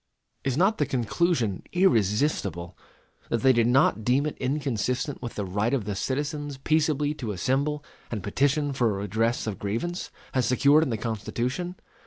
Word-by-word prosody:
Is 135 -1 -1
not 195 +6 +3
the 145 - +2
conclusion 125 - 0
irresistible, 110 - +1 0.5
that 115 - -1
they 130 - +6
did 115 -1 +3
not 120 -4 +3
deem 130 +5 +2
it 150 - -3
inconsistent 130 -1 -1
with 120 -2 -6
the 105 - -2
right 105 +7 0
of 115 -7 -2
"the 105 - -2
citizens 145 +4 -3
peaceably 150 0 +1
to 120 -8 -5
assemble 140 - 0 0.2
and 105 -5 -4
petition 140 +6 +1
for 125 -3 +2
a 100 -2 -2
redress 115 +4 0
of 110 -3 -4
grievance," 120 - -3 0.2
as 130 -4 +1
secured 140 +5 +5
in 160 - 0
the 115 - -1
Constitution? 120 - -3
130 Hz, 165 wpm, -26 LUFS, 110-145 Hz, 0.5 s, they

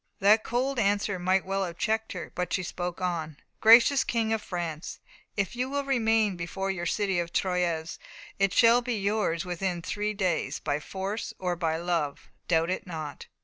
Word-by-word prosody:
That 210 +2 +5
cold 255 +2 -1
answer 205 -2 +1
might 185 +2 +2
well 195 +1 -1
have 175 -2 -5
checked 220 +3 -1
her, 180 - -6
but 180 0 -3
she 185 - 0
spoke 175 0 -4
on: 165 -4 -2 0.2
"Gracious 235 +5 +7
King 225 -1 0
of 220 - -1
France, 170 -4 -5 0.4
if 200 +2 -1
you 250 +2 -1
will 280 +1 -1
remain 225 -6 +2
before 190 +3 -3
your 175 -2 -3
city 195 -3 0
of 170 0 -3
Troyes, 175 -4 -1 0.4
it 195 -1 +3
shall 235 +4 +6
be 245 -1 -2
yours 200 -4 0
within 180 -1 -2
three 210 +3 -2
days 185 -5 0
by 145 -1 -2
force 195 +7 -5
or 180 -1 -1
by 165 -2 -1
love 165 -4 -2 0.2
doubt 165 0 +2
it 185 - -3
not." 155 -4 -6
190 Hz, 180 wpm, -28 LUFS, 170-215 Hz, 0.4 s, Gracious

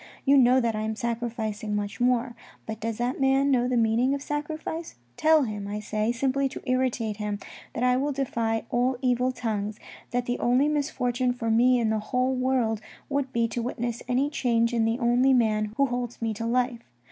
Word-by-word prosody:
You 280 0 +5
know 255 -1 +6
that 230 -3 0
I 215 - -2
am 220 0 -2
sacrificing 225 -2 -3
much 205 +2 -3
more. 245 0 +1 0.3
But 220 -1 -5
does 225 0 -3
that 245 +3 -2
man 270 +1 +3
know 245 -2 +3
the 250 -1 +1
meaning 230 +4 +2
of 280 - -6
sacrifice? 310 +3 -4 0.2
Tell 315 -1 +4
him, 210 -4 -4
I 205 +1 -3
say, 215 +1 -1
simply 270 +3 0
to - - -9
irritate 250 -4 0
him, 210 -1 -3 0.4
that 240 - -1
1 250 +1 +3
will 290 +1 0
defy 230 -5 -1
all 250 +1 +1
evil 250 0 +2
tongues, 215 -4 -3 0.3
that 245 0 -1
the 245 0 -2
only 250 +4 +3
misfortune 255 -4 0
for 230 -2 -2
me 250 +3 +5
in 225 -2 +1
the 220 - +1
whole 250 +4 0
world 255 -4 0 0.3
would 280 -2 -1
be 235 -1 +1
to 235 +1 -3
witness 240 -1 -3
any 260 +4 +1
change 235 -4 +1
in 230 -1 +2
the 225 +1 +1
only 250 +2 +3
man 215 -3 +1
who 275 - +4
holds 245 -2 -3
me 225 -1 -1
to 230 +2 -4
life. 245 0 0
245 Hz, 200 wpm, -26 LUFS, 225-260 Hz, 0.4 s, know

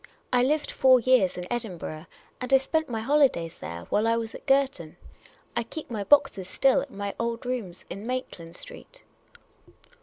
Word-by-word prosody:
" - - -25
I 245 - +5
lived 295 +4 +1
four 260 -1 +5
years 235 -7 +3
in 180 - -4
Edin 220 -7 -3
burgh. 155 0 -7 0.3
And 250 +1 -4
I 270 - +8
spent 315 +3 -1
my 225 -2 -3
liolidays 265 - +2
there 85 0 -6
while 215 +2 +2
I 230 0 +3
was 225 -1 -4
at - - -11
Girton. 270 - +1 0.6
I 235 - +1
keep 250 +4 -8
my 210 -3 -2
boxes 195 -7 +3
still 270 +7 +3
at 280 - -7
my 200 -4 -4
old 230 +1 -2
rooms 230 -9 -4
in 205 +3 -7
Maitland 215 -10 -5
Street." - - -10
235 Hz, 185 wpm, -27 LUFS, 195-270 Hz, 0.6 s, I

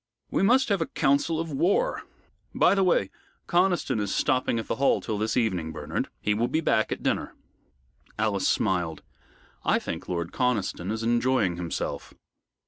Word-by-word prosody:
"We - - +1
must 250 +6 +4
have 200 -4 +1
a 165 - 0
counsel 150 +3 +1
of 165 -1 -3
war. 195 - +1 0.5
By - - +5
the 195 -1 +2
way, 170 - +2 0.3
Conniston 175 - +1
is 100 -2 -2
stopping 130 -4 +1
at 115 - -3
the - - -2
Hall 140 +1 +3
till 110 -3 -3
this 110 +3 -1
evening, 95 -9 0
Bernard. - - -4
He 105 - +1
will 115 +3 +1
be 145 +6 0
back 110 -8 +1
at - - -4
dinner." - - -1 0.8
Alice 105 -3 +1
smiled. 90 -6 0 0.6
"I - - +3
think - - -5
Lord 85 -1 -2
Conniston 110 -7 -1
is 110 +1 -3
enjoying 120 -5 +1
himself." 85 -4 -4
115 Hz, 165 wpm, -26 LUFS, 100-160 Hz, 0.8 s, By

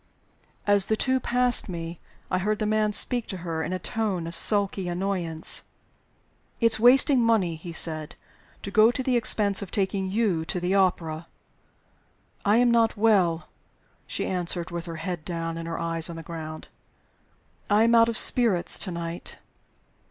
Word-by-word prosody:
As 205 -1 +3
the 220 - +1
two 260 +3 0
passed 245 -2 +1
me, 170 -1 -6 0.3
I 185 - +1
heard 210 +3 -1
the 215 - -2
man 215 0 +1
speak 240 +3 +2
to 190 - -5
her 165 -1 -3
in 160 - -4
a 185 - -2
tone 195 -2 -3
of 165 - -7
sulky 200 0 0
annoyance. 175 -3 0 1.0
"It's 230 -2 +2
wasting 255 +3 +7
money," 215 -8 +1
he 170 +2 -9
said, 155 -2 +1 0.5
"to 200 - -6
go 215 +2 +5
to 260 +2 -3
the 255 -1 0
expense 210 -4 +2
of 200 - -7
taking 190 -1 -2
you 195 -5 0
to 180 - -4
the 180 +2 -1
opera." 170 -4 0 1.2
"I 205 +2 +3
am 245 0 +3
not 230 -2 +2
well," 190 -7 +2 0.6
she - - -3
answered 175 -2 -3
with 170 0 -6
her 165 - -6
head 170 0 -5
down 165 -1 -4
and 165 0 -6
her 165 - -4
eyes 165 0 -1
on 170 - -7
the 165 - -8
ground. 155 -1 -8 1.0
"I 210 +1 +4
am 230 +1 +3
out 230 0 +5
of 230 - -3
spirits 225 -8 +1
to 195 - -2
night." 170 0 -6
190 Hz, 170 wpm, -25 LUFS, 170-220 Hz, 1.2 s, wasting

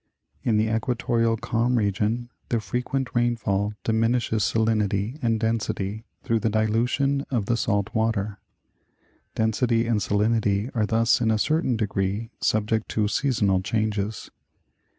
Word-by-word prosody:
In 110 -3 +1
the 110 +1 +2
equatorial 115 -1 0
calm 120 +3 0
region 110 +3 0 0.2
the 120 - +1
frequent 125 +6 -3
rainfall 105 -4 0
diminishes 115 0 +1
salin 110 0 +2
ity 100 +7 -2
and 115 -2 +1
density 110 -1 -2 0.2
through 115 -4 +1
the 110 - 0
dilution 120 +6 +1
of 120 -6 0
the 120 - +1
salt 100 -5 0
water. 110 -2 -1 1.0
Density 115 +1 +1
and 115 -2 +1
salinity 105 +2 +1
are 110 -2 +1
thus 115 +2 +3
in 115 - +2
a 110 - +3
certain 145 0 +1
degree 105 +1 -2
subject 110 0 0
to 105 -1 +1
seasonal 105 -6 +1
changes. 105 +1 -2
110 Hz, 130 wpm, -25 LUFS, 105-120 Hz, 1.0 s, thus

